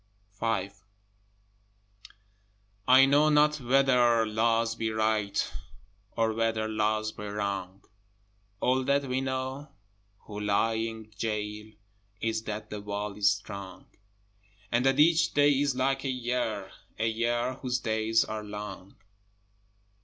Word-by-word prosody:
V 110 -4 0 2.2
I 130 +1 +8
know 145 +3 +4
not 150 0 +4
whether 125 -3 +3
Laws 115 +1 +1
be 115 -1 -2
right, 110 -2 0 0.6
Or 115 -1 +2
whether 110 -1 0
Laws 110 0 0
be 105 - -8
wrong; 100 -2 -4 0.8
All 130 +3 +2
that 140 +1 +2
we 130 0 -1
know 130 +2 -4 0.5
who 105 -1 -8
lie 105 +2 +1
in 110 -1 -4
goal 105 -1 -3 0.5
Is 110 -1 -1
that 105 0 -5
the 105 -1 -5
wall 105 0 -4
is 105 -1 +4
strong; 100 -2 -5 0.9
And 120 +1 +2
that 135 +1 +2
each 165 +2 +4
day 145 0 +5
is 140 -1 +1
like 135 +1 0
a 135 - -2
year, 120 -6 -2 0.3
A 115 - 0
year 120 +2 0
whose 125 -2 0
days 110 0 +1
are 110 0 -5
long. 105 -2 -8
115 Hz, 125 wpm, -28 LUFS, 105-130 Hz, 2.2 s, I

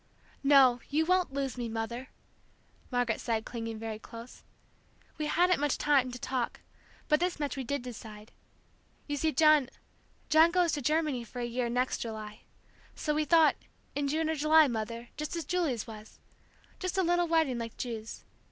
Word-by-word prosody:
"No, 270 -3 +6
you 310 +3 +1
won't 365 -2 +2
lose 270 -2 -3
me, 235 -1 -3
Mother," 230 +3 -4 0.8
Margaret 245 -3 0
said, 225 -2 -1
clinging 230 -2 -5
very 220 -1 -5
close. 230 +2 -11 0.8
"We 305 - -1
hadn't 360 +2 +3
much 290 -1 +1
time 275 -4 +2
to 245 - -6
talk, 250 -1 -3 0.5
but 300 - +3
this 355 -1 -1
much 290 -2 -2
we 270 - -4
did 280 +1 -3
decide. 220 -3 -9 0.7
You 290 - -3
see, 315 +2 +1
John 305 -2 +5 0.6
John 315 +2 +6
goes 350 -1 +2
to 290 - -2
Germany 300 -3 0
for 240 +2 -9
a 240 - -1
year, 240 0 -2
next 250 +2 0
July. 215 -2 -6 0.5
So 300 - -1
we 305 0 0
thought 320 +1 +5 0.4
in 285 0 -1
June 310 +3 0
or 320 - +1
July, 310 +1 +5
Mother, 230 0 -4
just 300 +2 -4
as 335 - -4
Julie's 320 - -1
was! 215 -1 -11 0.6
Just 370 0 -3
a 380 - +3
little 350 0 +2
wedding 320 -7 +2
like 230 -1 -6
Ju's. 225 -3 -6
270 Hz, 170 wpm, -30 LUFS, 235-310 Hz, 0.8 s, No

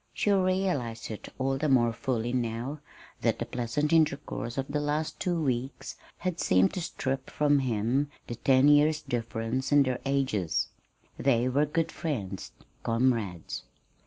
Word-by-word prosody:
She 205 - +1
realized 185 - 0
it 110 - -8
all 135 0 0
the 155 +1 +1
more 120 -3 +4
fully 120 0 -2
now 120 +4 -2 0.4
that - - +2
the - - -3
pleasant 125 +6 -1
intercourse 140 -6 +1
of 135 0 -1
the 145 +1 -1
last 150 +1 -1
two 175 -2 0
weeks 130 -3 -2 0.2
had 180 -2 -3
seemed 95 +1 +3
to 180 - -3
strip 135 -4 -3
from 145 -1 +3
him 125 +3 0 0.2
the - - -5
ten 130 +3 +4
years' 150 +1 +5
difference 115 +2 -2
in 145 -1 +6
their 130 -2 -1
ages. 130 - 0 0.5
They 125 -2 +3
were 140 +4 +2
good 165 +2 0
friends, 100 - -4 0.3
comrades. 115 -7 0
130 Hz, 150 wpm, -29 LUFS, 115-150 Hz, 0.5 s, in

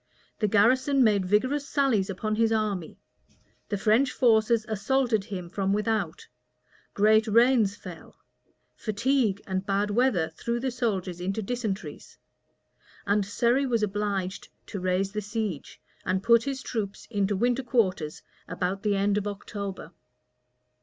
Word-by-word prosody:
The 210 - +2
garrison 255 +6 +4
made 205 -5 +2
vigorous 260 +9 +1
sallies 250 -9 +1
upon 215 +3 -2
his 225 0 +2
army: 210 -6 -1 0.7
the 205 - -1
French 225 +6 +3
forces 225 -1 +3
assaulted 220 0 0
him 190 -5 -6
from 195 +2 -1
without: 210 -5 -1 0.7
great 215 +2 +4
rains 230 -2 +4
fell: 175 -5 -11 0.6
fatigue 220 -1 0
and 190 -1 -2
bad 200 +1 0
weather 205 -8 +2
threw 235 +9 -3
the 260 +1 -2
soldiers 195 -8 -2
into 195 +4 -2
dysenteries: 215 -2 -5 0.9
and 205 0 +2
Surrey 240 +7 +1
was 230 -3 +1
obliged 200 -2 -2 0.2
to 200 - -6
raise 185 +1 0
the 210 +1 -3
siege, 210 -6 -4 0.2
and 185 +1 -1
put 235 +1 +5
his 270 -1 -3
troops 210 -4 -4
into 205 -2 0
winter 245 +5 +1
quarters 190 -11 0 0.2
about 180 +2 -2
the 205 -1 +1
end 200 +1 +2
of 205 - -5
October. 200 -1 -6
210 Hz, 135 wpm, -27 LUFS, 195-235 Hz, 0.9 s, put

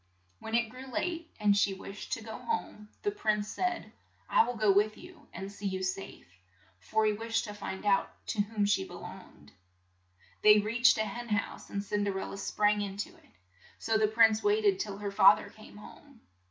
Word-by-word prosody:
When 220 - -4
it 235 -2 +1
grew 260 +1 -10
late 335 +5 -3
and 205 -1 +4
she 200 -1 +2
wished 195 +1 -9
to 225 - -4
go 220 0 -7
home, 215 - -4
the 410 - +1
prince 210 - 0
said, 360 -1 -2 0.4
"I - - +5
will 245 - -3
go 215 -2 +3
with 210 +2 +2
you 345 -5 -14
and 195 +3 -7
see 205 0 -5
you 190 -1 -3
safe," 185 +1 -4 0.5
for 215 - 0
he 215 - +3
wished 225 +2 -1
to 210 - -6
find 200 -1 -6
out 200 -1 +3 0.2
to 210 - +1
whom 205 0 -1
she 200 - +2
be - - -10
longed. - - -12 0.9
They 210 0 +8
reached 230 +5 +4
a 220 - +1
hen 240 +3 -6
house, 205 -1 -2
and 200 0 -3
Cin 205 0 -1
der 200 -1 -1
el - - -4
la - - -7
sprang 210 +1 +1
in 200 -1 -4
to 205 - -3
it; - - -22 0.5
so 225 - -1
the 215 - +4
prince 220 0 +4
wait 420 +1 +2
ed 390 -1 +3
till 200 - -4
her 205 -1 -4
fa 170 -4 +8
ther - - -9
came 215 -1 -14
home. 260 +4 -15
210 Hz, 210 wpm, -30 LUFS, 205-235 Hz, 0.9 s, They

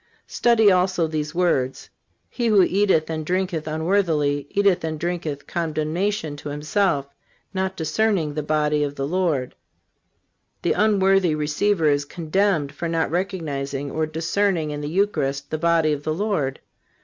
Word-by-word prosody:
Study 225 -4 +4
also 180 -2 +2
these 155 0 -3
words: 140 -7 0 0.4
"He 240 -2 -2
who 205 -4 +5
eateth 185 -4 +2
and 160 -1 -3
drinketh 180 -2 -1
unworthily 155 -4 0
eateth 195 -3 +2
and 160 -1 -3
drinketh 165 -4 -3
condemnation 160 +1 -2
to 145 - -7
himself, 150 +1 0 0.5
not 190 0 -2
discerning 165 -1 0
the 150 - -2
body 150 0 +1
of 145 -1 -3
the 135 - -2
Lord." 155 -6 0 1.1
The - - +2
unworthy 195 -5 +3
receiver 155 +4 +1
is 145 -1 +2
condemned 165 -1 0
for 170 - -4
not 165 -1 0
recognizing 145 -7 -3
or 155 0 -1
discerning 165 +1 0
in 145 0 -4
the 145 - -4
Eucharist 145 -7 -1
the 155 - -2
body 165 -2 +3
of 145 - -4
the 155 +1 -2
Lord. 165 -9 -1
160 Hz, 145 wpm, -23 LUFS, 150-190 Hz, 1.1 s, who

